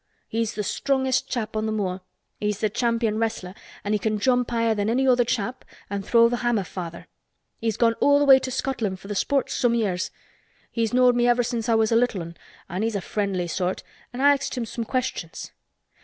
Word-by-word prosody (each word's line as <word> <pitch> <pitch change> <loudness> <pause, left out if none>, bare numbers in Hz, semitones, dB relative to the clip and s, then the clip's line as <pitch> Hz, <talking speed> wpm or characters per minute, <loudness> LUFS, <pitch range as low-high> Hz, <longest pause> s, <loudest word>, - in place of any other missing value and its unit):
He's 225 0 -2
the 210 - -2
strongest 265 +3 0
chap 225 -4 -3
on 215 0 0
th' - - -1
moor. 190 -3 -2 0.4
He's 210 -1 -1
the 215 -1 -1
champion 230 -2 0
wrestler 220 -5 -2 0.3
an' 205 - -1
he 210 - +2
can 215 +1 0
jump 245 +3 +2
higher 230 -1 +1
than 205 0 -1
any 260 +3 +2
other 250 -1 +5
chap 240 +2 -2 0.3
an' 200 0 -2
throw 230 +3 +5
th' 240 +1 -1
hammer 240 -4 +1
farther. 170 -2 -7 0.5
He's 225 -2 -1
gone 230 -1 +3
all 285 0 +4
th' - - -4
way 265 -1 +9
to 260 - -4
Scotland 240 -7 -2
for 195 - -12
th' 205 - -4
sports 275 +7 0
some 240 -1 +2
years. 195 -6 0 0.6
He's 230 -2 -1
knowed 250 0 +4
me 240 0 +3
ever 245 0 +3
since 235 -1 -2
I 230 - +4
was 220 0 +2
a - - +4
little 230 -6 +1
'un 170 +1 -9 0.3
an' 185 +3 -4
he's 225 -1 -1
a - - +1
friendly 195 -3 -2
sort 180 +1 -2 0.3
an' 245 - -5
I 285 +1 +7
axed 275 -2 -3
him 240 - -1
some 230 +1 -5
questions. 255 -10 -3
230 Hz, 215 wpm, -24 LUFS, 205-245 Hz, 0.6 s, way